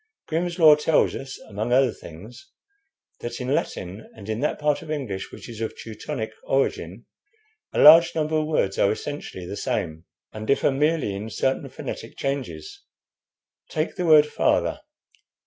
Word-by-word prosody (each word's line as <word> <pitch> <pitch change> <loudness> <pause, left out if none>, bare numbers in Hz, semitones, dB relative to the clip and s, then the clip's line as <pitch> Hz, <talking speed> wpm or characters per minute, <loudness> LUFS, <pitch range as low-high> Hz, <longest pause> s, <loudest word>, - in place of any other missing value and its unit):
'Grimm's 170 +2 -2
Law' 160 -3 +8
tells 150 +1 +2
us, 135 0 -7
among 110 +3 -3
other 130 -1 +4
things, 105 - -12 0.7
that 120 0 -5
in 130 +2 -1
Latin 95 -4 -3
and 105 -1 -11
in 110 +1 -2
that 150 - 0
part 150 -1 0
of 160 - -11
English 130 -11 -4
which - - -10
is 115 -2 -8
of 110 - -4
Teutonic 110 0 -5
origin, 115 -6 -1 0.7
a - - -2
large 165 +3 +8
number 155 0 0
of 155 0 0
words 95 -11 0
are 100 - +4
essentially 110 -7 -6
the 95 - -6
same, 80 -4 -3 0.3
and 110 0 -7
differ 140 - +3
merely 150 -5 +1
in 105 +3 -5
certain 130 +4 -1
phonetic - - -7
changes. 140 - -4 0.9
Take 155 0 -2
the 180 -2 -2
word 155 -2 +8
'father.' 150 - 0
135 Hz, 160 wpm, -24 LUFS, 110-155 Hz, 0.9 s, Law